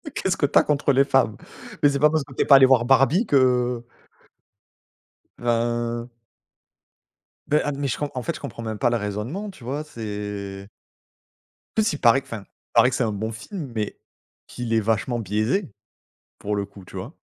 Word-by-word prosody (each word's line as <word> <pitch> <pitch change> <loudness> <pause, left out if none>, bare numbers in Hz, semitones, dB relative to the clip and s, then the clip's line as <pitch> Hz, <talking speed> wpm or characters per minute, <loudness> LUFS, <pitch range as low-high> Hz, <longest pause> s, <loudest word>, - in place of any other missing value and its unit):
Qu'est-ce 190 - 0
que 145 - +2
tu 140 - +2
as - - +3
contre 145 -1 +1
les 135 +1 +4
femmes? 135 -6 +2 0.4
Mais, 145 - +6
c'est 140 -1 -1
pas 150 +1 +6
parce 155 -2 0
que 135 - -14
tu - - -1
es - - -6
pas 140 - +8
allée 135 -1 +8
voir 130 -3 +4
Barbie 135 - +4
que 125 -4 +2 1.6
enfin. 120 0 -1 1.4
Beh, 150 - +3
hein, 145 - -1
d 140 - -7
mais 140 -1 -1
je - - -1
comp 145 -1 -2
en 125 - -3
fait 165 +2 -3
je - - -11
comprends 135 -4 -7
même 110 -2 -4
pas 120 - +2
le 120 - +1
raisonnement, 115 - -4
tu 145 -11 -15
vois, 140 +4 -3
c'est 105 -5 -6 1.1
En 220 - +3
plus, 210 -7 +1
il - - -5
paraît 120 +3 +5
qu'enfin, 110 -6 -8 0.3
paraît 120 +2 +6
que - - -2
c'est - - 0
un 110 - -1
bon 110 +3 -3
film, 135 - -7
mais 105 -1 -3 0.5
qu'il 120 -2 -4
est 110 - +4
vachement 115 +3 0
biaisé, 110 - -1 0.7
pour 105 0 -3
le 100 -1 -1
coup, 95 -2 -15
tu - - -14
vois? - - -7
120 Hz, 200 wpm, -23 LUFS, 110-140 Hz, 1.6 s, pas